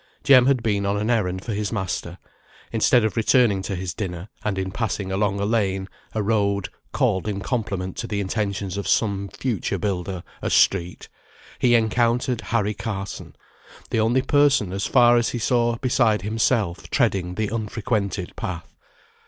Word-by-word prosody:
Jem 130 -3 +6
had 130 -4 +2
been 100 -3 +1
on 100 +1 0
an 105 +3 0
errand 95 -5 -1
for 115 - -3
his 105 0 -2
master, 95 -4 -3 0.5
instead 115 +1 +3
of 110 - -1
returning 115 -3 +3
to 95 +1 -4
his 90 -1 -4
dinner; 90 -1 -5
and 105 -2 -1
in 95 0 -2
passing 100 -3 -2
along 100 0 0
a 100 - 0
lane, 95 -4 0 0.3
a 110 - -1
road 100 -2 +1 0.2
(called, 95 +2 0
in 100 -2 -2
compliment 100 -5 -3
to 115 - -4
the 105 -2 -2
intentions 100 -1 -2
of 100 - -3
some 100 -3 +1
future 115 -6 -2
builder, 95 -1 -3 0.2
a - - -1
street), 90 -2 +2 0.5
he 120 -1 +4
encountered 120 +1 +1
Harry 105 -2 0
Carson, 100 -3 -6 0.6
the - - +1
only 120 +4 +2
person, 140 -11 +3
as 100 +1 -2
far 120 0 +5
as 120 - +1
he - - -3
saw 120 0 +1
beside 120 -5 +1
himself, 110 -3 0
treading 95 -8 0
the 110 0 -1
unfrequented 105 -4 -2
path. 85 -2 -6
105 Hz, 165 wpm, -23 LUFS, 95-115 Hz, 0.6 s, Jem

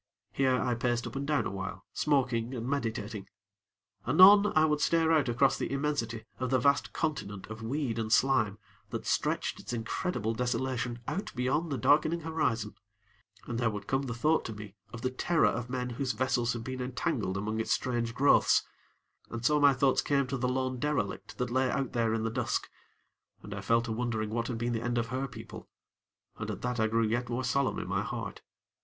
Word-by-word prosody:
Here, 130 -2 +2
I 125 - 0
paced 120 0 0
up - - -7
and 140 +1 -3
down 150 -2 +1
awhile, 95 -1 -5
smoking 130 -4 +1
and 120 0 -4
meditating. 110 -6 -3 0.8
Anon, 200 +8 +8
I 155 0 +6
would 150 -1 +1
stare 165 -1 +3
out 150 -5 +3
across 130 +3 +3
the - - -2
immensity 135 -6 -2
of 130 -1 -1
the 130 - +3
vast 140 +3 +2
continent 105 -10 -3
of 110 +1 -7
weed 120 0 -2
and 110 -1 -2
slime 110 -5 +3 0.3
that - - -5
stretched - - 0
its - - -6
incredible 115 - -2
desolation 125 0 -2
out 195 - -3
beyond 135 +6 0
the 135 - -1
darkening 155 +7 +3
horizon, 135 -10 -1 0.7
and 120 -1 -3
there 120 -2 +2
would 105 -2 -5
come 135 +4 0
the 125 -4 -4
thought 155 +7 +2
to 110 - -4
me 105 -2 -9 0.2
of 120 - -8
the 130 - 0
terror 165 +6 +2
of 120 0 0
men 125 -1 -2
whose 130 +1 -2
vessels 120 0 +1
had 120 -1 -5
been 130 +1 -5
entangled 125 - -2
among 110 +3 -2
its 110 - -2
strange 120 -2 0
growths, 140 +2 +4 0.7
and 115 0 -5
so 150 +2 +4
my 145 -1 +7
thoughts 135 0 +2
came 140 -1 +1
to 130 +1 -3
the 125 0 0
lone 130 0 -1
derelict 150 -1 -2
that 125 -1 -2
lay 130 +1 +2
out 135 0 -2
there 115 -2 +1
in 110 - -1
the 115 - -1
dusk, 120 0 -2 0.7
and 105 - -7
I 100 - -5
fell 115 +4 +2
to 115 - -4
wondering 110 -2 -2
what 115 +1 -1
had 120 - -3
been 120 +1 -1
the 115 - -1
end 120 0 -1
of 115 -1 -1
her 130 +2 -2
people, 115 -3 -10 0.7
and - - -4
at - - -5
that 125 -1 -1
I 110 - +3
grew 115 +1 +2
yet 120 +2 -1
more 125 +2 -2
solemn 130 +2 +1
in - - -4
my - - 0
heart. - - -5
125 Hz, 205 wpm, -30 LUFS, 115-135 Hz, 0.8 s, Anon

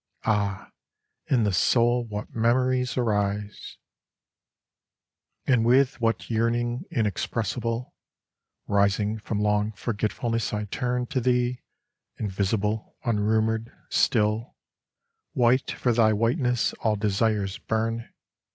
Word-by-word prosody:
Ah, 100 -3 -1 0.6
in 125 -4 +3
the 105 -2 +1
soul 120 +6 +3
what 105 -1 -6
memories 125 +3 +1
arise! 105 -3 -1 1.7
And 125 -4 +3
with 130 +3 +3
what 115 0 0
yearning 120 +4 0
inexpressible, 115 +2 -2 0.7
Rising 100 +1 +1
from 105 0 -3
long 105 +1 +1
forgetfulness 115 +1 -2
I 105 0 -2
turn 125 +4 -2
To 130 -1 -2
Thee, 125 0 +1 0.6
invisible, 105 +1 -2
unrumoured, 110 +1 +1 0.2
still: 110 +1 +1 0.8
White 125 -1 +3
for 120 - 0
Thy 110 -1 +4
whiteness 120 +2 +1
all 110 -2 +1
desires 105 -1 0
burn. 115 +1 -2
115 Hz, 95 wpm, -26 LUFS, 105-120 Hz, 1.7 s, Thy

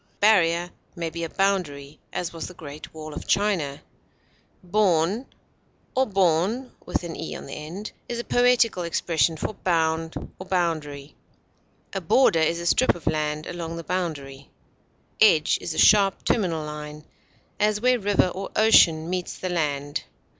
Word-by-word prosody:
A - - -41
barrier 175 -4 +3 0.2
may 165 -2 -3
be 170 0 -5
a 165 - -3
boundary, 155 -8 -1
as 175 -1 -4
was 165 - -5
the 180 - -11
Great 150 -1 -10
Wall 155 -1 -8
of - - -8
China. 185 -9 0 0.8
Bourn, 190 +3 +1 0.7
or 260 0 +2
bourne, 195 +6 +1 0.2
is 170 +7 -6
a - - -3
poetical 245 -6 +3
expression 165 -1 0
for 215 - -3
bound 165 -3 0 0.2
or 185 - -8
boundary. 155 -6 -2 0.8
A - - -2
border 255 -11 +4
is 165 +2 +1
a 170 - -5
strip 255 +9 +3
of 175 - -12
land 155 0 -1
along 170 -1 -5
the 165 - -6
boundary. 155 -7 -4 0.7
Edge 160 -8 +5
is 160 - -4
a - - -6
sharp 200 -2 +5
terminal 170 -8 0
line, 150 0 -8 0.5
as 210 0 +2
where 250 +2 +3
river 200 -2 +2
or 190 +2 -6
ocean 165 -7 +5
meets 180 0 -3
the 185 - -4
land. 145 -4 -2
170 Hz, 140 wpm, -24 LUFS, 155-195 Hz, 0.8 s, Edge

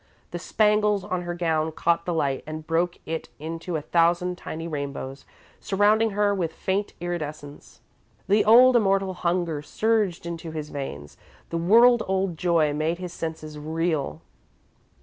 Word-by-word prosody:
The - - -4
spangles 210 -2 +2
on 185 -1 -2
her 175 0 -4
gown 160 -2 0
caught 170 +1 0
the 175 - 0
light 140 -4 0
and 155 0 -6
broke 170 +2 0
it 160 0 -4
into 165 +3 -5
a 155 - -2
thousand 175 +2 +2
tiny 165 -2 -6
rainbows, 140 -3 -5 0.3
surrounding 210 +3 +3
her 205 -1 +3
with 170 -5 -2
faint 195 +4 -2
iridescence. 155 -4 -6 0.5
The 205 +2 +4
old, 250 +3 +7
immortal 195 -4 +2
hunger 170 -3 -1
surged 210 +1 0
into 170 -1 -5
his 155 -1 -6
veins, 75 - -7 0.3
the 170 - -1
world 235 +7 +6
old 190 -2 0
joy 160 -3 +2
made 155 +3 -1
his 180 -1 -7
senses 155 -2 -6
reel. 160 -1 -2
170 Hz, 150 wpm, -25 LUFS, 155-195 Hz, 0.5 s, old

